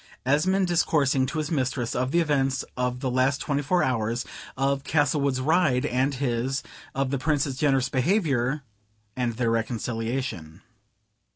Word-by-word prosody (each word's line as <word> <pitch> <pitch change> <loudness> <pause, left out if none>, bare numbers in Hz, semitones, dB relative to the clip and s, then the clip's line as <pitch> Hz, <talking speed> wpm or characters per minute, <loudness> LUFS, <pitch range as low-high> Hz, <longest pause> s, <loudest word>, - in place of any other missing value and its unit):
Esmond 185 +8 +2
discoursing 145 -6 +2
to 140 - -4
his 155 0 -2
mistress 130 -5 -1
of 130 +1 0
the 170 +5 +3
events 135 -4 +1
of 125 0 -2
the 130 - -1
last 130 +3 +2
twenty 145 -1 -1
four 175 +5 +2
hours; 120 -1 -1 0.3
of 135 +1 0
Castlewood's 145 -3 +1
ride 145 -2 +2
and 135 +1 +1
his; 130 0 -1 0.3
of 135 -1 0
the 140 - 0
Prince's 145 -1 0
generous 135 -2 +2
behavior 140 - +1 0.5
and 125 -2 -1
their 115 0 0
reconciliation. 115 -6 -3
135 Hz, 145 wpm, -26 LUFS, 125-145 Hz, 0.5 s, the